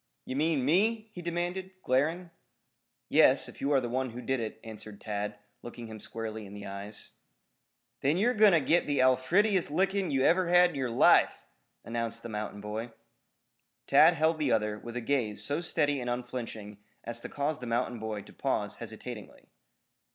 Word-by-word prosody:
"Ye - - -4
mean 150 -1 +1
me?" 215 +8 +2
he 180 - -7
demanded, 175 +2 -3
glaring. 160 +7 0 0.8
"Yes, - - +5
if - - -12
you 140 - 0
are 140 - +5
the 125 - -3
one 130 +2 -1
who 120 +2 -8
did 130 +2 0
it," 110 -1 -5
answered 110 -2 -10
Tad, 105 -1 -4 0.2
looking 120 0 -8
him 110 -1 -9
squarely 110 -1 -6
in 100 - -11
the 100 0 -8
eyes. 100 +2 -7 0.9
"Then 145 +5 +1
your 235 +6 +3
going 215 -3 +6
to 165 - +4
git 165 +5 +2
the 145 -2 0
alfiredest 170 +10 +3
lickin' 195 +4 +1
you 135 -1 +1
ever 180 +4 +3
had 180 0 +6
in - - -10
your 130 -3 -1
life," 115 - +4 0.4
announced 115 0 -3
the 120 - -6
mountain 105 -1 -5
boy. 110 +3 -5 0.9
Tad 165 +2 +6
held 160 +1 +2
the 145 -5 +1
other 105 -2 0
with 120 +2 -7
a - - -2
gaze 115 -4 -1
so 145 +3 0
steady 145 -5 0
and 125 - -3
unflinching 120 -4 -5 0.2
as 115 0 -5
to - - -8
cause 145 +1 -2
the 125 - -7
mountain 120 0 -1
boy 110 -2 -4
to - - -15
pause - - -2
hesitatingly. - - -9
130 Hz, 180 wpm, -30 LUFS, 110-165 Hz, 0.9 s, going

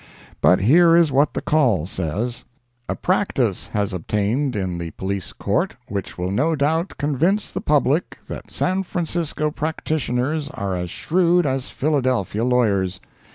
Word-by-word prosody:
But 90 - +5
here 165 - +6
is 170 -3 +4
what 140 +3 +2
the - - -2
Call 120 - +2
says: 100 +7 -3 0.5
A - - 0
practice 140 - 0
has 105 -2 -2
obtained 105 - -1
in 95 -4 -2
the 85 -1 -4
Police 95 +3 -4
Court, - - -1
which 100 -1 -4
will 90 +1 -2
no 150 +10 +1
doubt 160 +5 0
convince 150 +9 +1
the - - -4
public 150 +2 +1
that - - -7
San 185 +1 0
Francisco 170 -4 -2
practitioners 150 -2 -2
are 100 -2 -2
as 90 -1 -3
shrewd 175 - +2
as 135 -2 -1
'Philadelphia 130 - 0
lawyers.' 100 -7 +1
130 Hz, 145 wpm, -22 LUFS, 100-155 Hz, 0.5 s, here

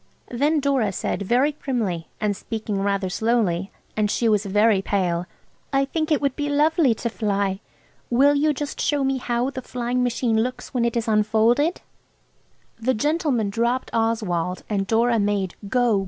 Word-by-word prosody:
Then 290 +6 +2
Dora 270 -7 +1
said 190 - -3
very 245 +9 +2
primly 225 - -3
and 210 -1 0
speaking 215 -2 -4
rather 200 -1 0
slowly, 195 -3 0 0.3
and 210 -1 +1
she 230 - +1
was 210 -1 +2
very 205 0 +3
pale– 180 -3 -1 0.4
"I 275 0 +2
think 310 +3 -2
it 300 - +4
would 280 -2 0
be 290 -1 -2
lovely 295 -3 +3
to 235 - -3
fly. 200 -4 -1 0.5
Will 275 +4 +4
you 300 +2 +2
just 290 0 -4
show 290 -2 +1
me 270 0 +1
how 245 +2 -1
the 260 - -6
flying 245 0 -2
machine 235 -2 +1
looks 250 +2 -4
when 245 -2 +1
it 235 0 0
is 230 - -2
unfolded?" 225 +8 +2 1.0
The 255 +3 +1
gentleman 275 -5 0
dropped 235 +4 -1
Oswald, 210 -6 -1
and 195 -2 -1
Dora 230 +1 +2
made 200 -3 0 0.2
"Go! 245 -4 +2
230 Hz, 165 wpm, -23 LUFS, 205-265 Hz, 1.0 s, it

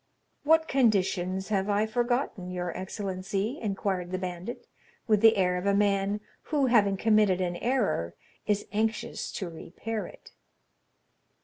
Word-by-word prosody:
"What 320 +2 +4
conditions 190 - +1
have 200 -1 0
I 205 +1 +2
forgotten, 240 -4 -1
your 180 -1 -3
excellency?" 195 +5 -3
inquired 195 -4 -2
the 185 - -2
bandit, 185 +4 -5 0.4
with 215 -3 +3
the 225 -1 +6
air 180 -1 +2
of 180 +2 -3
a 200 - +3
man 200 0 +1 0.2
who, 290 -3 +1
having 210 -6 +3
committed 210 -3 +3
an 175 -1 -1
error, 200 - 0 0.3
is 205 -1 +1
anxious 220 +1 -2
to 190 - -4
repair 200 +6 -5
it. - - -15
200 Hz, 135 wpm, -28 LUFS, 185-225 Hz, 0.4 s, the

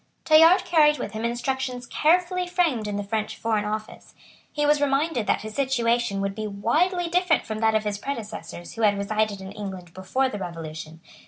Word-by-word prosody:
Tallard 325 +3 +6
carried 305 -4 +4
with - - -5
him 220 +1 -5
instructions 250 +1 -2
carefully 360 +6 +1
framed 335 - 0
in 205 - -3
the 205 - -2
French 215 +1 -3
Foreign 220 -2 0
Office. 215 +1 -6 0.4
He 295 0 -1
was 295 0 +3
reminded 275 -4 +1
that - - +1
his 215 0 -7
situation 235 -5 0
would 195 0 -2
be 215 +1 -4
widely 325 - 0
different 355 -1 +2
from 220 -1 -4
that 220 0 +2
of 215 - +2
his 205 -1 -3
predecessors 210 -9 -6
who 230 - -6
had 205 -2 +3
resided 210 0 -1
in 190 0 -8
England 190 -4 -8
before 225 +9 0
the 210 -5 -5
Revolution. 160 -2 -7
225 Hz, 185 wpm, -25 LUFS, 205-295 Hz, 0.4 s, Tallard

